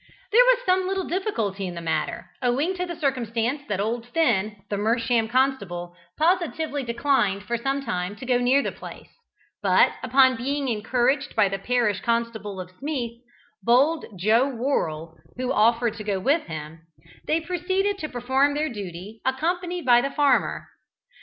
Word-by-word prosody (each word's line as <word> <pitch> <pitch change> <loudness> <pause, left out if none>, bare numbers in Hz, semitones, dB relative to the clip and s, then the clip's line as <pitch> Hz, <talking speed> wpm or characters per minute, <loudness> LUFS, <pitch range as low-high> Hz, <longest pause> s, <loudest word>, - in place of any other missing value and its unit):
There 475 +4 +7
was - - +3
some 370 0 +2
little 385 0 -1
difficulty 225 - -2
in 175 - -6
the - - -5
matter, 165 -1 -3
owing 270 +8 +1
to 360 -1 -3
the 345 - -5
circumstance 255 -3 -1
that 205 -2 -2
old 230 +3 -2
Finn, 220 -8 +1
the 205 - -2
Mersham 230 +2 +1
constable, 200 -10 0 0.2
positively 320 -3 0
declined 235 -5 +1
for 235 +3 -2
some 270 +3 -2
time 180 -2 -2
to 220 - -9
go 250 -1 +2
near 260 +3 +3
the - - -2
place, - - -11 0.5
but - - +4
upon 260 0 +4
being 275 +3 -2
encouraged 250 +6 0
by 200 - +4
the 195 0 -3
parish 235 -2 +1
constable 230 -4 -2
of 180 0 -7
Smeeth, 245 -5 -4 0.4
bold 270 - +3
Joe 220 +8 +3
Worrell, 170 - -2 0.2
who 255 0 -2
offered 230 +1 +3
to 215 - -6
go 200 -2 -1
with 290 - +1
him, 155 0 -7 0.5
they 315 - +2
proceeded 375 +4 -1
to 310 - -4
perform 265 +4 +1
their 305 +1 0
duty, 200 -1 -8
accompanied 345 +5 -1
by 240 -1 +6
the 275 - -1
farmer. 285 -1 +1
245 Hz, 160 wpm, -24 LUFS, 210-290 Hz, 0.5 s, There